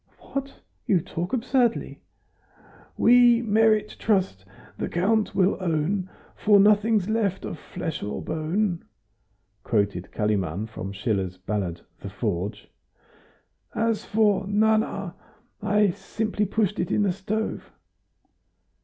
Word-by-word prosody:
"What! 275 Hz, 0 st, -4 dB, 0.3 s
You 190 Hz, -, +4 dB
talk 170 Hz, +2 st, -5 dB
absurdly." 250 Hz, -1 st, 0 dB, 1.0 s
"We 240 Hz, 0 st, +6 dB
merit 215 Hz, -1 st, +2 dB
trust, 190 Hz, -, 0 dB, 0.3 s
the -, -, -2 dB
Count 210 Hz, +5 st, +1 dB
will 190 Hz, 0 st, +3 dB
own; 180 Hz, +3 st, -1 dB, 0.3 s
For 205 Hz, -1 st, +4 dB
nothing's 210 Hz, 0 st, +4 dB
left 215 Hz, -4 st, 0 dB
of 165 Hz, -, -6 dB
flesh 170 Hz, -3 st, -5 dB
or 105 Hz, -, -4 dB
bone," 170 Hz, +4 st, -1 dB, 0.8 s
quoted 100 Hz, -5 st, 0 dB
Kalimann 100 Hz, -3 st, -1 dB
from 105 Hz, -3 st, -7 dB
Schiller's 95 Hz, -3 st, -2 dB
ballad 95 Hz, -3 st, -3 dB, 0.2 s
"The 100 Hz, -, -7 dB
Forge." 100 Hz, 0 st, -3 dB, 1.1 s
"As 225 Hz, -1 st, 0 dB
for 205 Hz, -3 st, +2 dB
'Nana,' 205 Hz, -3 st, +1 dB, 0.5 s
I've 210 Hz, -3 st, +2 dB
simply 215 Hz, -1 st, -2 dB
pushed 205 Hz, 0 st, 0 dB
it 175 Hz, -, -1 dB
in 210 Hz, -, +2 dB
the 200 Hz, -, +2 dB
stove." 205 Hz, +4 st, -4 dB
195 Hz, 110 wpm, -25 LUFS, -, 1.1 s, We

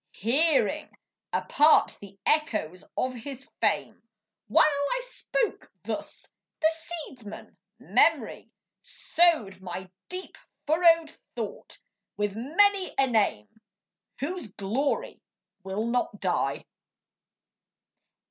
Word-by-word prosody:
Hearing 275 Hz, -, +2 dB, 0.3 s
apart 305 Hz, +2 st, +4 dB
the 200 Hz, -1 st, -12 dB
echoes 215 Hz, -, +1 dB
of 255 Hz, 0 st, 0 dB
his 265 Hz, +2 st, -8 dB
fame. -, -, +1 dB, 0.5 s
While 320 Hz, -1 st, +5 dB
I 285 Hz, +9 st, 0 dB
spoke -, -, -2 dB
thus, -, -, -5 dB, 0.3 s
the 315 Hz, 0 st, +4 dB
seedsman, 310 Hz, -10 st, -7 dB, 0.2 s
Memory, -, -, +2 dB, 0.3 s
Sowed 275 Hz, -, +2 dB
my 185 Hz, 0 st, -7 dB, 0.2 s
deep 365 Hz, +1 st, -6 dB, 0.3 s
furrowed 330 Hz, 0 st, +4 dB, 0.2 s
thought 225 Hz, -4 st, -6 dB, 0.4 s
with 205 Hz, -1 st, -1 dB
many 370 Hz, -, +2 dB
a 270 Hz, -, +5 dB
name 220 Hz, -, 0 dB, 0.6 s
Whose 285 Hz, -, -4 dB
glory 235 Hz, +9 st, -2 dB, 0.4 s
will 195 Hz, +3 st, -3 dB
not 235 Hz, -3 st, -1 dB
die. 175 Hz, -7 st, -1 dB
265 Hz, 90 wpm, -27 LUFS, 205-320 Hz, 0.6 s, While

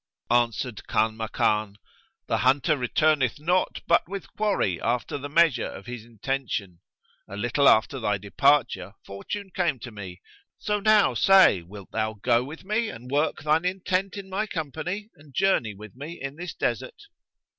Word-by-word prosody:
Answered 120 Hz, -1 st, +1 dB
Kanmakan, 110 Hz, -1 st, 0 dB, 0.5 s
"The -, -, 0 dB
hunter 135 Hz, +4 st, +3 dB
returneth 145 Hz, +1 st, +1 dB
not 180 Hz, +5 st, 0 dB
but 170 Hz, 0 st, +3 dB
with 200 Hz, -1 st, -7 dB
quarry 200 Hz, -, 0 dB
after 120 Hz, +4 st, -1 dB
the 145 Hz, +1 st, -6 dB
measure 155 Hz, -5 st, +3 dB
of 95 Hz, -, -9 dB
his 125 Hz, -2 st, -7 dB
intention. 115 Hz, -6 st, -4 dB, 0.5 s
A 100 Hz, -, -8 dB
little 120 Hz, +6 st, +3 dB
after 120 Hz, +5 st, +3 dB
thy 105 Hz, -3 st, 0 dB
departure, 100 Hz, -2 st, +1 dB
fortune 190 Hz, -, -6 dB
came 170 Hz, -7 st, +1 dB
to 120 Hz, -, -7 dB
me: 95 Hz, -4 st, -9 dB, 0.4 s
so 210 Hz, 0 st, -1 dB
now 215 Hz, 0 st, +4 dB
say, 190 Hz, -, +6 dB
wilt 95 Hz, +3 st, -12 dB
thou 110 Hz, 0 st, -1 dB
go 120 Hz, +3 st, +2 dB
with 150 Hz, +5 st, -9 dB
me 215 Hz, +3 st, 0 dB
and 125 Hz, +3 st, -10 dB
work 150 Hz, +2 st, 0 dB
thine 155 Hz, +2 st, +2 dB
intent 185 Hz, +1 st, -1 dB
in 195 Hz, -1 st, -7 dB
my 195 Hz, +3 st, -2 dB
company 180 Hz, +6 st, -4 dB
and 145 Hz, -2 st, -18 dB
journey 155 Hz, -, +2 dB
with 105 Hz, +1 st, -12 dB
me 150 Hz, +6 st, -8 dB
in 135 Hz, +1 st, -5 dB
this 175 Hz, +2 st, -7 dB
desert?" 465 Hz, -, -3 dB
135 Hz, 155 wpm, -26 LUFS, 110-180 Hz, 0.5 s, say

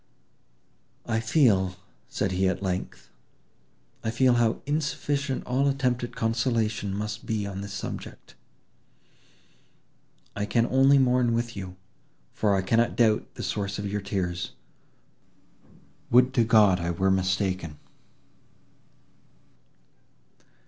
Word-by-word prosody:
"I 110 Hz, -1 st, 0 dB
feel," 110 Hz, -, +2 dB, 0.3 s
said 100 Hz, -3 st, -1 dB
he 95 Hz, +1 st, +1 dB
at 95 Hz, +1 st, -3 dB
length, 90 Hz, -1 st, -4 dB, 0.9 s
"I 110 Hz, -, -1 dB
feel 125 Hz, +2 st, +3 dB
how 120 Hz, -2 st, +1 dB
insufficient 145 Hz, -2 st, -2 dB
all 130 Hz, +3 st, +1 dB
attempt 130 Hz, -3 st, 0 dB
at 120 Hz, -, -6 dB
consolation 115 Hz, -2 st, 0 dB
must 105 Hz, +1 st, -5 dB
be 110 Hz, -2 st, -1 dB
on 100 Hz, -1 st, -5 dB
this 100 Hz, 0 st, -7 dB
subject. 105 Hz, -, -7 dB, 2.0 s
I 105 Hz, 0 st, -2 dB
can 115 Hz, +2 st, +2 dB
only 135 Hz, +2 st, +4 dB
mourn 125 Hz, -2 st, +3 dB
with 120 Hz, 0 st, -2 dB
you, 95 Hz, -2 st, -7 dB, 0.6 s
for 105 Hz, -2 st, +1 dB
I 95 Hz, -, 0 dB
cannot 115 Hz, +4 st, +1 dB
doubt 110 Hz, -2 st, +1 dB
the -, -, -6 dB
source 100 Hz, -1 st, -3 dB
of 105 Hz, -, -4 dB
your 105 Hz, 0 st, -2 dB
tears. 90 Hz, -3 st, -3 dB, 1.6 s
Would 125 Hz, +2 st, +5 dB
to 120 Hz, -, +3 dB
God 105 Hz, -5 st, +5 dB
I 85 Hz, 0 st, -2 dB
were 95 Hz, +3 st, +1 dB
mistaken!" 95 Hz, -4 st, -1 dB
110 Hz, 115 wpm, -26 LUFS, 95-120 Hz, 2.0 s, Would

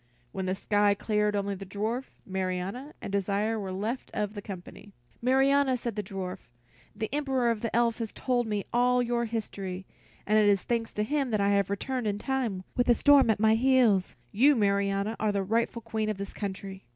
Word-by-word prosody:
When 190 Hz, +4 st, -4 dB
the 185 Hz, -, 0 dB
sky 205 Hz, 0 st, +2 dB
cleared, 210 Hz, 0 st, 0 dB
only 200 Hz, 0 st, -1 dB
the 195 Hz, 0 st, -7 dB
dwarf, 215 Hz, +7 st, -3 dB, 0.2 s
Marianna, 190 Hz, +8 st, -3 dB
and -, -, -5 dB
Desire 200 Hz, +3 st, 0 dB
were 195 Hz, -2 st, -4 dB
left 215 Hz, +7 st, -3 dB
of 210 Hz, -1 st, -1 dB
the 205 Hz, -, -6 dB
company. 195 Hz, +1 st, -10 dB, 0.3 s
"Marianna," 270 Hz, +1 st, +3 dB
said 235 Hz, -3 st, -4 dB
the 210 Hz, -, -1 dB
little 195 Hz, -1 st, -6 dB
dwarf, 180 Hz, -6 st, -6 dB, 0.5 s
"the 220 Hz, +1 st, -2 dB
Emperor 265 Hz, -5 st, +1 dB
of 220 Hz, -2 st, -3 dB
the 230 Hz, -, -2 dB
Elves 235 Hz, -1 st, +2 dB
has 225 Hz, -2 st, -3 dB
told 245 Hz, -2 st, -1 dB
me 210 Hz, -2 st, -2 dB
all 250 Hz, +1 st, +3 dB
your 235 Hz, 0 st, 0 dB
history, 195 Hz, -4 st, -5 dB, 0.4 s
and 215 Hz, +1 st, +4 dB
it 210 Hz, -1 st, +5 dB
is 200 Hz, -2 st, +2 dB
thanks 230 Hz, -2 st, -1 dB
to 210 Hz, -, 0 dB
him 275 Hz, +2 st, 0 dB
that 215 Hz, -2 st, 0 dB
I 200 Hz, 0 st, +2 dB
have 200 Hz, -1 st, +2 dB
returned 245 Hz, +4 st, -2 dB
in 205 Hz, -1 st, 0 dB
time, 235 Hz, -6 st, -2 dB
with 245 Hz, -, +1 dB
the 240 Hz, -, +6 dB
storm 285 Hz, -3 st, +5 dB
at 215 Hz, -, +2 dB
my 220 Hz, 0 st, +5 dB
heels. 235 Hz, -5 st, +3 dB, 0.2 s
You, 275 Hz, +7 st, +5 dB
Marianna, 200 Hz, 0 st, +1 dB
are 215 Hz, -1 st, +1 dB
the 200 Hz, -1 st, 0 dB
rightful 230 Hz, +3 st, -1 dB
Queen 220 Hz, -1 st, -2 dB
of 215 Hz, -, -2 dB
this 200 Hz, 0 st, -6 dB
country." 195 Hz, -1 st, -6 dB
215 Hz, 205 wpm, -28 LUFS, 200-240 Hz, 0.5 s, the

